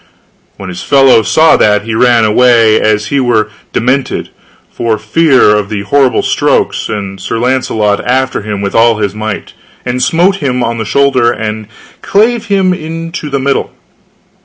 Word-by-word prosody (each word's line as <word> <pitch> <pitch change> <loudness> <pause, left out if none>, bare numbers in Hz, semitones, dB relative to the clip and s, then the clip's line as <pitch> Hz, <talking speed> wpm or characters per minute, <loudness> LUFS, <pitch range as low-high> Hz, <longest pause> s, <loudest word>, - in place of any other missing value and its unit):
When 95 - -8
his 90 - -7
fellow 135 -4 +4
saw 155 - +3
that, 105 -1 +2
he 115 +1 -5
ran 120 0 +3
away 115 0 +3
as 105 0 0
he 140 - 0
were 120 -4 +1
wood 105 - -19 0.2
[*demented], 130 +3 -1 0.4
for 115 -2 -2
fear 130 -1 +2
of 105 -1 -2
the 100 -2 -4
horrible 135 +4 +1
strokes, - - 0
and 100 -2 -5
Sir 115 - -3
Launcelot 115 -4 -1
after 130 0 -1
him 105 -1 -5
with 100 -1 -3
all 115 -1 +3
his 100 -2 -2
might, 110 -1 -6 0.3
and 125 0 -2
smote 175 +9 +2
him 125 -6 -2
on 115 0 -3
the 110 - -3
shoulder, 130 -1 +2
and 110 -2 -5 0.3
clave 225 +3 +1
him 165 -4 -2
to 165 -3 -6
the 140 -1 -2
middle. 135 +1 -2
120 Hz, 165 wpm, -11 LUFS, 110-140 Hz, 0.4 s, fellow